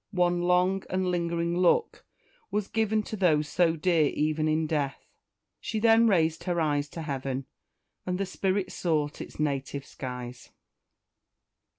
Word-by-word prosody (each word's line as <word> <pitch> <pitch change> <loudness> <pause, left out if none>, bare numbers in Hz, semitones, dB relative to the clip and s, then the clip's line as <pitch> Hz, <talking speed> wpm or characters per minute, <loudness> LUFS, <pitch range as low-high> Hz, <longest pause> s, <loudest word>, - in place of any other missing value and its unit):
One 175 -1 +2
long 180 +2 +2
and 185 0 0
lingering 170 -1 -1
look 185 - +2 0.5
was 210 -1 -1
given 220 -1 0
to 215 - -6
those 155 -7 +2
so 165 +1 +2
dear 165 -1 +2
even 155 +2 0
in 155 +1 +1
death. 145 -3 -2 0.5
She 220 - -4
then 225 +1 +5
raised 165 -5 +2
her 175 -2 0
eyes 145 -2 0
to 165 - -7
heaven, 135 -2 -3 0.6
and 180 0 -2
the 195 - -1
spirit 190 0 -1
sought 150 -4 -1
its - - -10
native 140 -2 -2
skies! 125 -3 -7
170 Hz, 145 wpm, -28 LUFS, 150-185 Hz, 0.6 s, then